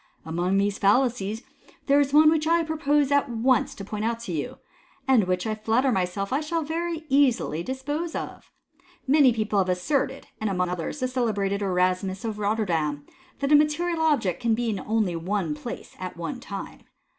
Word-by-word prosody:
*' - - -38
Among 175 +4 0
these 200 0 0
fallacies 220 0 +1 0.4
there 280 0 +4
is 280 -1 +1
one 305 +1 +7
which 315 -1 +1
I 335 0 +3
propose 295 -3 +1
at 285 -1 +2
once 240 +1 +1
to 195 - -8
point 210 +1 -4
out 230 +1 -1
to 230 - -6
you, 210 - -4 0.5
and 250 -7 +4
which 180 0 -1
I 220 - -1
flatter 225 +5 +1
myself 195 +1 -1
I 275 - +2
shall 320 +1 -2
very 330 +1 -3
easily 265 - +2
dispose 290 - -4
of. - - -6 0.6
Many 280 -1 +5
people 215 -3 0
have 185 -1 +1
asserted, 220 +11 -1
and, 220 - -1
among 180 -2 0
others, 180 - -4
the 255 - +1
celebrated 210 -6 -1
Erasmus 185 +1 0
of 215 -2 -3
Rotterdam, 170 -9 -1 0.4
that 280 +1 0
a - - +8
material 320 +3 +2
object 275 - +1
can 230 -2 +2 0.3
only 215 -4 +1
be 165 - -3
in 165 - -12
one 190 -5 -1
place 235 +10 -8
at 185 -1 -6
one 245 +10 -5
time. 200 -5 -7
225 Hz, 185 wpm, -25 LUFS, 190-285 Hz, 0.6 s, a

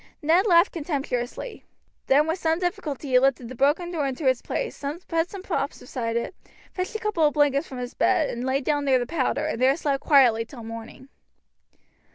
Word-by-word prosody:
Ned 340 +7 +4
laughed 345 0 +5
contemptuously. 285 - -4 0.4
Then 285 +3 +5
with 325 +3 -2
some 325 -1 +1
difficulty 350 -6 -3
he 255 -1 +5
lifted 260 -2 +1
the - - -7
broken 295 +7 +1
door 305 -5 -1
into 270 +3 -4
its 260 -2 +2
place, - - -4 0.2
put 330 +1 0
some 390 -2 -8
props 310 -7 -2 0.2
behind 230 -2 -1
it, 235 - -3 0.4
fetched 370 +3 -4
a - - -1
couple 425 -7 0
of 295 - -3
blankets 290 0 +2
from 260 - -8
his 245 0 -5
bed, 305 - +2
and 235 - -5
lay 265 +2 0
down 290 +1 0
near 265 -2 +4
the 245 - -1
powder, 290 +1 -1
and 280 -6 -3
there 265 +3 +4
slept 280 -4 -1
quietly 250 -6 +5
till 235 0 -11
morning. 230 +4 -9
285 Hz, 200 wpm, -25 LUFS, 255-330 Hz, 0.4 s, laughed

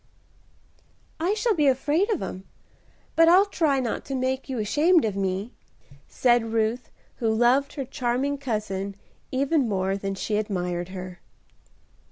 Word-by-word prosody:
"I 360 +6 +1
shall 440 +1 +1
be 300 -6 +2
afraid 290 - +2
of 415 -7 0
'em, 190 +1 -6 0.7
but 330 0 +6
I'll 370 +4 +6
try 310 -8 +1
not 245 -3 -2
to 270 - -4
make 260 +1 -2
you 260 - -3
ashamed 295 - +3
of 210 -3 -2
me," 195 +4 -2 0.5
said 240 -2 +2
Ruth, 225 +2 0 0.3
who 225 -2 0
loved 245 +5 +3
her 275 - -4
charming 260 +3 -1
cousin 205 -6 -3 0.4
even 275 -1 +1
more 190 -1 0
than 195 0 -3
she 210 +2 -2
admired 180 -4 -2
her. 185 -1 -8
245 Hz, 145 wpm, -25 LUFS, 200-285 Hz, 0.7 s, but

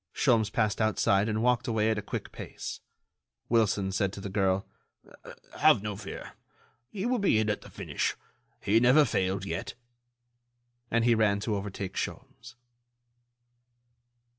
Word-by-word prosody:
Sholmes 115 -6 +3
passed 110 -2 0
outside 105 -1 +2
and 110 +1 -1
walked 125 -1 +2
away 110 -1 +1
at 110 - -1
a - - -4
quick 105 - -6
pace. - - -7 0.7
Wilson 105 -4 +2
said 100 0 0
to - - -7
the 100 - -5
girl: 95 -1 +1 0.9
"Have 100 - +5
no 105 -1 -3
fear... 100 0 -8 0.6
he 200 0 -4
will 245 0 +1
be 195 - +3
in 110 -1 +2
at 105 - -3
the - - -13
finish. - - -2 0.5
He 110 +3 +3
never 125 +5 +6
failed 95 -4 -1
yet." 100 - -4 1.1
And 115 0 +1
he 120 - +5
ran 105 -3 +2
to 105 0 -1
overtake 100 -1 -5
Sholmes. 130 +2 -6
110 Hz, 145 wpm, -29 LUFS, 100-120 Hz, 1.1 s, never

